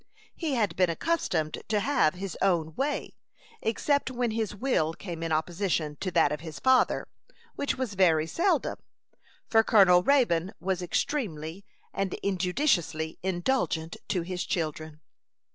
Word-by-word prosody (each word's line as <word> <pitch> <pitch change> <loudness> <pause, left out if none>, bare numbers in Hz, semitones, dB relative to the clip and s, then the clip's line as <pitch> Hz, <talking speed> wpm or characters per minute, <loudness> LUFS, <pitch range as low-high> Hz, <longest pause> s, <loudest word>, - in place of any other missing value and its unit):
He 310 -5 -2
had 215 -4 0
been 180 -1 +3
accustomed 165 - -1
to 210 -1 +1
have 205 - +2
his 190 -1 -5
own 165 -5 +1
way, 285 - -3 0.4
except 280 +6 0
when 245 -2 -1
his 220 -2 -2
will 195 -9 0
came 170 -4 -7
in 165 -1 -3
opposition 160 -1 -1
to 185 - -3
that 155 -4 +3
of 150 - -2
his 160 -3 -8
father, 260 - +3 0.5
which 285 - -2
was 255 -5 -3
very 165 -5 +3
seldom, 335 - 0 0.7
for 225 -1 +4
Colonel 190 -5 +6
Raybone 195 -11 +2
was 185 +1 -1
extremely 180 - -2 0.3
and 195 -1 -2
injudiciously 180 - 0
indulgent 175 -3 -1
to 180 -4 -1
his 180 +1 -3
children. 155 -3 -3
185 Hz, 140 wpm, -28 LUFS, 160-230 Hz, 0.7 s, Colonel